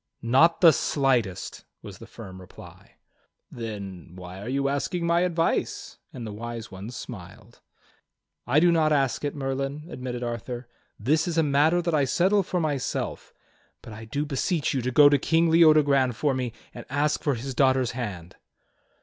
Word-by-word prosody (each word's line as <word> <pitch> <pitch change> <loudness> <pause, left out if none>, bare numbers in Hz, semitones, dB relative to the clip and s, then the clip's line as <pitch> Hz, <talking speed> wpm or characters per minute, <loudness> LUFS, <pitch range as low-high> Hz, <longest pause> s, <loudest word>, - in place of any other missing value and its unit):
"Not 135 +9 +4
the 165 -3 +8
slightest," 125 -11 -1 0.2
was - - -10
the - - -11
firm 95 0 -11
reply. 90 - -15 0.6
"Then, 100 -6 -7
why 90 +1 -9
are 105 - -6
you 140 +1 0
asking 155 +5 -2
my 170 0 +3
advice?" 175 -2 -1
and 120 -3 -8
the 105 - -6
Wise 115 +1 -7
One 95 +3 -8
smiled. 100 -7 -10 0.9
"I 135 +5 +4
do 175 +2 +4
not 160 -2 +2
ask 135 -3 +1
it. 145 0 -2
Merlin," 135 +1 -3
admitted 125 -2 -5
Arthur. 120 +1 -5 0.3
"This 155 +10 +1
is 170 -1 -2
a 165 - +4
matter 150 +4 +2
that 170 -1 -1
I 145 -3 +3
settle 190 +9 +2
for 180 -1 -2
myself; 145 -5 -3 0.5
but 110 - -10
I 110 +1 -9
do 145 +6 -3
beseech 150 +2 -1
you 135 - -1
to 125 - -2
go 145 +3 +7
to 145 -1 +4
King 165 +3 +2
Leodogran 150 -6 +5
for 140 +5 0
me 125 -2 -2 0.2
and 120 - -9
ask 145 +3 0
for 145 -4 0
his 130 +3 -5
daughter's 130 -2 +2
hand." 100 -9 -6
135 Hz, 170 wpm, -25 LUFS, 120-155 Hz, 0.9 s, the